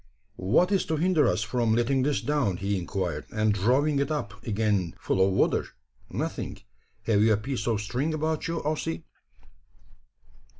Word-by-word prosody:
"What 110 - +2
is 195 - +3
to 160 - 0
hinder 165 -2 +3
us 90 +4 +1
from 115 0 +1
letting 125 +3 +2
this 140 +1 +1
down," 135 -11 0
he 100 +2 -1
inquired, 90 -4 -3
"and 110 -1 +2
drawing 130 +9 +2
it 140 0 0
up 145 -9 -2
again 105 -5 0
full 95 - +1
of 95 - +3
water? 95 - +2 0.4
Nothing. - - -4 0.5
Have 105 -3 +2
you 110 +1 +5
a - - +2
piece 120 +1 -4
of 110 -3 +1
string 125 +9 -1
about 155 0 -1
you, 165 0 -3
Ossy?" 145 - -2
115 Hz, 165 wpm, -27 LUFS, 100-150 Hz, 0.5 s, you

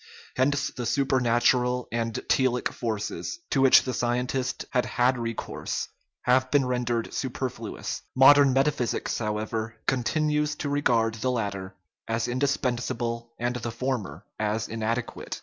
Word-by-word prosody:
Hence 140 +2 +1
the 125 -2 -5
supernatural 125 -2 +2
and 115 -1 -2
telic 130 -2 +2
forces, 110 - -3
to 135 - +2
which 135 -1 +7
the 130 - -3
scientist 125 +2 -1
had 125 - +2
had 125 +1 +2
recourse, 115 -1 -4 0.3
have 130 +1 +3
been 140 -1 +3
rendered 120 -2 -1
super 130 -1 -2
fluous. 115 -3 -6
Modern 140 +1 +7
metaphysics, 135 -2 0
however, 110 +1 -3
continues 150 +3 +1
to 145 - -3
regard 120 -6 +2
the 115 +3 -2
latter 100 -6 -3 0.3
as 115 +1 -1
indispensable 120 -3 -1
and 120 +1 -1
the 120 0 -4
former 120 -2 -3
as 105 0 -1
inadequate. 115 +2 -3
125 Hz, 130 wpm, -26 LUFS, 115-130 Hz, 0.3 s, which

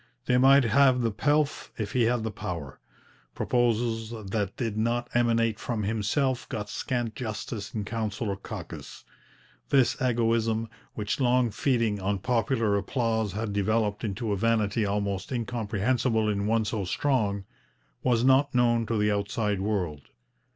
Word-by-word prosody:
They 125 -1 +3
might 135 +1 +7
have 125 +2 +4
the 115 -1 +1
pelf 145 +7 0
if 105 -3 -3
he 125 -2 +2
had 120 -1 +1
the 110 - -2
power. 85 -8 -6 0.6
Proposals 115 -2 0 0.2
that 100 -3 -2
did 115 -4 -2
not 120 +2 0
emanate 115 -2 +2
from 115 -3 -2
himself 115 +5 0
got 105 -1 -4
scant 120 -4 -2
justice 110 -3 -5
in 105 -2 -2
council 110 -1 -3
or 100 - -1
caucus. 100 - -8 0.7
This 135 -3 +4
egoism, 115 -2 +1 0.3
which 105 +3 -2
long 125 -2 +3
feeding 115 -3 +1
on 100 +1 0
popular 115 0 +1
applause 110 -2 -1
had 105 0 -3
developed 105 +1 0
into 110 +1 -2
a - - +2
vanity 110 0 +1
almost 100 0 -2
incomprehensible 115 -1 0
in 100 -1 0
one 110 0 +2
so 105 -1 -2
strong, 100 -2 0 0.6
was 120 -2 +2
not 135 +1 +4
known 120 -2 +3
to 115 - 0
the 105 0 +2
outside 105 0 -1
world. 90 -9 -2
115 Hz, 145 wpm, -27 LUFS, 105-120 Hz, 0.7 s, might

